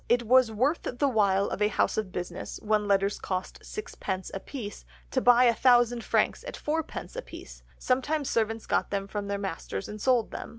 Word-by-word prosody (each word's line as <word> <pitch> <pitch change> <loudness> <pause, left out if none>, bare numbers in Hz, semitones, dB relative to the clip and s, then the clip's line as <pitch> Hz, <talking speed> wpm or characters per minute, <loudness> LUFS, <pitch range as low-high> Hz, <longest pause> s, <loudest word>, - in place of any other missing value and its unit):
It 240 0 +3
was 250 0 +5
worth 260 +10 +1
the 250 +4 -1
while 200 -5 +3
of - - -4
a 210 - +5
house 210 - +1
of 215 -4 -2
business, 180 0 -5
when 210 -1 +1
letters 200 0 +2
cost 185 -1 -4
sixpence 190 - -5
apiece, 205 - -7 0.3
to - - +1
buy 245 0 +6
a 240 -2 +5
thousand 240 0 +4
franks - - +1
at - - -6
fourpence 315 +2 -3
apiece; - - -9 0.2
sometimes 270 +3 0
servants 225 -1 0
got - - 0
them 195 -1 -2
from 205 0 -4
their 200 0 -1
masters 165 - -4
and 210 0 -8
sold 245 -3 +2
them. - - -6
220 Hz, 185 wpm, -28 LUFS, 200-250 Hz, 0.3 s, buy